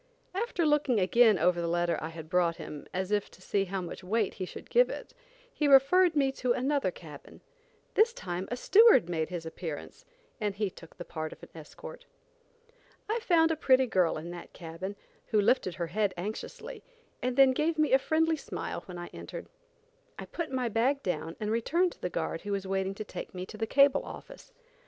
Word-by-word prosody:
After 385 -4 -1
looking 295 -6 +3
again 215 +3 +5
over 175 +1 +2
the 170 - -1
letter 175 0 +1
I 155 - -4
had 160 -1 -9
brought 175 -1 +2
him, 155 -3 -8
as 185 +2 -3
if 205 -1 0
to - - -18
see 195 +1 0
how 190 0 -3
much 175 +1 -7
weight 210 +2 0
he 185 - -4
should - - -11
give - - +5
it, - - -7 0.4
he 300 - 0
referred 310 +6 +6
me 275 -2 +3
to 250 -2 0
another 270 -3 0
cabin. 155 -5 -12 0.5
This 445 +2 +4
time 180 - -5
a 245 - -3
steward 400 - +6
made 160 -2 -1
his 175 -2 -5
appearance 160 -2 -7 0.4
and 210 -3 -1
he 205 -2 -1
took 165 - -15
the 175 - -7
part 155 -1 -5
of - - -13
an - - -11
escort. 155 -2 -11 1.0
I 445 +3 0
found 335 -8 +3
a - - +1
pretty 260 -3 +4
girl 185 -9 +1
in 165 +3 -6
that 175 -1 -10
cabin, 175 +4 -7 0.3
who 215 - +2
lifted 205 -4 +2
her 175 - -2
head 195 +3 -1
anxiously, 415 - -6 0.4
and 250 0 -2
then 270 -1 +7
gave 310 +5 0
me 305 -3 +2
a 265 - +7
friendly 320 +3 +1
smile - - -5
when 180 -2 -8
I 175 0 -7
entered. - - -8 0.7
I - - -6
put 335 -4 -5
my 255 -2 0
bag 250 +6 +1
down 165 -2 -3
and 210 0 -2
returned 335 +11 +1
to - - -17
the 180 - -2
guard 165 -1 -3
who 205 0 -3
was 195 -1 -2
waiting 190 0 -1
to 215 - -5
take 205 - -8
me 180 0 -4
to 215 - -11
the 225 +1 -2
cable 275 +3 +4
office. - - -11
210 Hz, 205 wpm, -29 LUFS, 175-275 Hz, 1.0 s, then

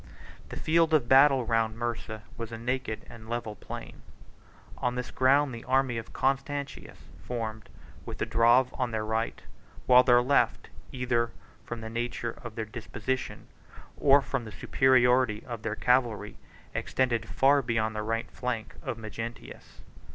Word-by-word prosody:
The - - -7
field 160 0 +3
of 130 -6 +2
battle 135 -1 +6
round 115 -1 0
Mursa 115 -2 -4
was 115 -1 -6
a 115 - -5
naked 125 -1 -3
and 110 -1 -12
level 120 -2 -3
plain: - - -9 0.8
on 125 0 -1
this 125 -1 -4
ground 135 +1 +3
the 115 - -7
army 130 -2 +1
of 115 - -10
Constantius 140 +1 -2 0.3
formed, 110 -3 -4 0.3
with - - -7
the - - -1
Drave 120 +3 +4
on 125 -2 -1
their 110 -2 -2
right; 110 +1 -2 0.4
while 125 0 +8
their 120 -1 +5
left, 140 +3 +1 0.2
either 120 -2 0 0.4
from 120 -1 -5
the 110 - -6
nature 120 0 -3
of 120 -2 -8
their 110 - -3
disposition, 125 +3 -4 0.5
or 140 0 +5
from 135 -2 -2
the 110 - -9
superiority 125 -3 +3
of 120 -3 -6
their 110 -1 -3
cavalry, 120 -4 +1 0.4
extended 115 -4 -1
far 140 +7 +4
beyond 110 -3 -1
the 105 - -2
right 115 +1 -2
flank 125 -3 -4
of 115 - -4
Magnentius. 115 +1 -8
120 Hz, 150 wpm, -28 LUFS, 115-130 Hz, 0.8 s, while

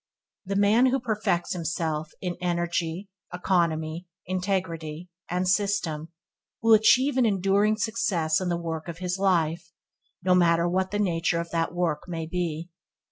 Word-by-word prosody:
The 195 - -2
man 210 +5 +4
who 265 +1 +1
perfects 215 -7 -1
himself 160 -2 -2
in 180 -2 -3
Energy, 175 +1 -1 0.2
Economy, 170 -2 0 0.2
Integrity, 180 -3 -3 0.2
and 180 +1 -1
System 180 -5 0 0.5
will 225 0 +5
achieve 255 +6 +5
an 255 - +4
enduring 200 +2 +2
success 205 -8 0
in 185 - -1
the 170 - 0
work 165 -1 -5
of 170 -1 -6
his 180 +1 -3
life, 170 -4 +1 0.5
no 185 0 +3
matter 170 -1 +4
what 185 +2 0
the 205 - -2
nature 170 -4 +1
of 170 0 -5
that 165 -1 0
work 175 -3 -1
may 165 -2 -4
be. 170 0 -3
180 Hz, 145 wpm, -26 LUFS, 165-195 Hz, 0.5 s, will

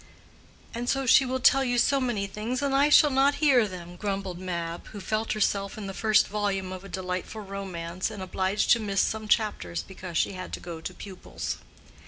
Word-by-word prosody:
"And 240 +1 -3 0.2
she 260 +2 +6
will 260 +1 -1
tell 270 +1 +5
you 245 -2 0
so 275 +3 +3
many 240 -6 -1
things 225 +7 -3
and 280 -1 0
I 280 +2 +4
shall 295 0 +7
not 270 +2 +3
hear 270 -7 +4
them," 175 -2 -9
grumbled 195 -2 -3
Mab, 170 -2 -4
who 210 - -9
felt 215 +4 -1
herself 200 -2 0
in 215 - -6
the 195 - -5
first 215 +1 +3
volume 200 -2 -2
of 185 0 -7
a 195 - -10
delightful 185 +3 -4
romance 185 -3 -4
and 205 -3 -7
obliged 190 +2 0
to 235 - +6
miss 200 -2 -1
some 220 -1 -2
chapters 205 - 0
because 185 -3 -7
she - - +2
had 185 -1 -7
to - - -3
go 170 -2 -8
to 185 - -5
pupils. 190 -3 -6
200 Hz, 200 wpm, -27 LUFS, 185-235 Hz, 0.2 s, shall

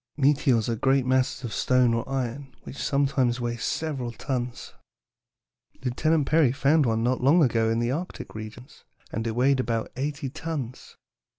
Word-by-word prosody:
"Meteors 135 -5 +3
are 115 - 0
great 135 +3 +2
masses 130 0 +1
of 115 -3 -4
stone 125 0 +3
or 115 +3 -2
iron 135 +1 -4
which - - -9
sometimes 135 -3 +1
weigh 120 -1 -2
several 135 -1 -3
tons. 125 0 -4 1.1
Lieutenant 155 +4 +1
Peary 155 -5 +4
found 140 +1 +3
one 115 0 +1
not 125 +2 +1
long 150 +6 +5
ago 115 -3 +2
in 115 - +1
the 120 +1 0
Arctic 170 +7 -5
regions, 110 +4 -10 0.3
and 115 +2 -3
it 110 - -2
weighed 130 +2 +3
about 115 -3 -1
eighty 140 +2 -3
tons. 145 -3 -6
130 Hz, 160 wpm, -26 LUFS, 120-140 Hz, 1.1 s, long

